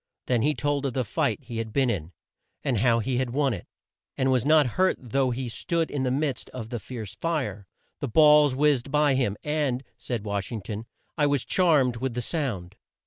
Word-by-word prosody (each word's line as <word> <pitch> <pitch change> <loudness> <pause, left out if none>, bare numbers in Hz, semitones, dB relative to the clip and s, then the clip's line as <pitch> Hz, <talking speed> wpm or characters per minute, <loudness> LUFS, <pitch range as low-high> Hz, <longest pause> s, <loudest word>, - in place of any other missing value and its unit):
Then 120 -3 +1
he 150 +4 +2
told 145 -1 0
of 130 - -4
the 130 -1 -1
fight 145 +5 -1
he 120 -2 -7
had 110 -1 -4
been 130 0 +2
in, 85 -4 -4 0.5
and 125 -6 0
how 115 +1 +4
he 125 +2 -1
had 130 -2 -1
won 135 +1 +1
it, 95 - -7 0.5
and 130 0 +2
was 130 -3 +2
not 155 -1 +6
hurt 185 +10 +2
though 130 +1 0
he 125 +1 -3
stood 165 +7 -1
in 145 - -2
the 130 - +1
midst 140 +1 -1
of 115 -3 -6
the 120 -1 -4
fierce 110 -4 -7
fire. 110 - -3 0.3
The 140 - -2
balls 150 +1 +6
whizzed 140 -2 +2
by 150 0 +3
him, 125 -6 0
"and," 145 -4 -1 0.2
said 115 -4 -4
Wash 100 -2 -3
ing 110 -3 -4
ton 110 +2 -6 0.3
"I 145 - +4
was 140 -3 +1
charmed 145 -10 +3
with 130 0 -3
the 125 - -1
sound." 105 - -3
130 Hz, 210 wpm, -26 LUFS, 115-145 Hz, 0.5 s, not